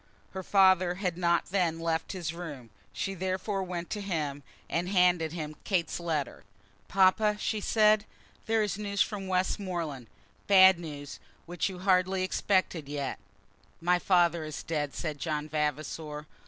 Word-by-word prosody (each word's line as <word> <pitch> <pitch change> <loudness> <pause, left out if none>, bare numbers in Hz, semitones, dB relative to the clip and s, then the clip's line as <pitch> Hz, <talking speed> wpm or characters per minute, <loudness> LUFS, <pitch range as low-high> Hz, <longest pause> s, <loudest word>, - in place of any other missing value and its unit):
Her 190 - -5
father 185 -2 +4
had 180 -2 -2
not 170 0 +1
then 175 -4 +1
left 165 +1 -1
his 170 -4 -4
room. 145 -10 -8 0.2
She 195 - -3
therefore 190 +2 -2
went 175 -2 -5
to 210 - -3
him, 155 -7 -3 0.3
and 175 +2 -1
handed 180 -4 +3
him 155 -2 -5
Kate's 175 -5 -1
letter. 160 -5 -3 0.4
"Papa," 195 +2 +3
she 215 -1 -1
said, 215 0 +4 0.4
"there 225 -1 +2
is 205 0 -3
news 200 -1 +1
from 200 -3 -6
Westmoreland; 180 - -2 0.4
bad 190 -2 +7
news, 145 -4 -8 0.3
which 175 +3 -2
you 185 - -7
hardly 185 0 +2
expected 185 -5 0
yet." 145 -2 -3 0.6
"My 175 +1 +2
father 175 -3 +3
is 155 -1 -6
dead," 150 -3 -2
said 155 -4 -4
John 150 -1 -2
Vavasor. 150 0 -3
175 Hz, 145 wpm, -29 LUFS, 155-190 Hz, 0.6 s, bad